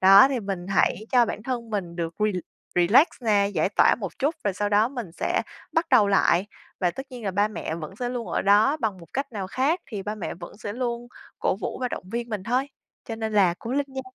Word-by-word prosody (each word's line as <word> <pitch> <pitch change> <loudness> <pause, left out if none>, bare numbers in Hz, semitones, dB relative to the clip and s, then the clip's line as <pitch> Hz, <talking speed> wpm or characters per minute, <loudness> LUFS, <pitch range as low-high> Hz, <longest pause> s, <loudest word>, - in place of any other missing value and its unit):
Đó, 195 +6 +9
thì 265 -3 -1
mình 195 -3 -4
hãy 195 +2 +1
cho 245 -2 +6
bản 215 - -5
thân 235 -2 -4
mình 180 -5 -3
được 165 -1 -3
re 215 0 +2 0.4
relax 200 - +6 0.2
nè, 205 -3 +3
giải - - +2
tỏa 200 - +4
một 195 -4 -6
chút, 295 +4 +1
rồi 200 - +1
sau 205 +2 -1
đó 210 +2 +4
mình 240 -10 -6
sẽ - - 0 0.3
bắt 325 +1 +1
đầu 205 -2 +6
lại. 195 -1 +3 0.3
Và 180 -2 +2
tất 265 +10 -7
nhiên 245 -3 -8
là 195 - 0
ba 205 +3 +2
mẹ 160 -6 -4
vẫn 170 +4 -7
sẽ 245 0 -2
luôn 245 -2 -4
ở - - 0
đó 210 +8 +5
bằng 210 -6 -1
một 170 - -13
cách 275 -1 -3
nào 195 -3 -3
khác 275 - +1
thì 205 -4 -5
ba 210 +2 -3
mẹ 210 - -5
vẫn 170 0 -10
sẽ 205 -1 -5
luôn 240 0 -3 0.3
cổ - - +1
vũ - - -3
và 250 - 0
động - - -5
viên 235 0 -2
mình 210 -4 -3
thôi. 250 +7 0 0.4
Cho 225 - -5
nên 220 -1 -3
là 190 -4 +4
cố 235 - -6
lên 285 0 +1
nha!" 265 0 -5
215 Hz, 250 wpm, -25 LUFS, 195-245 Hz, 0.4 s, Đó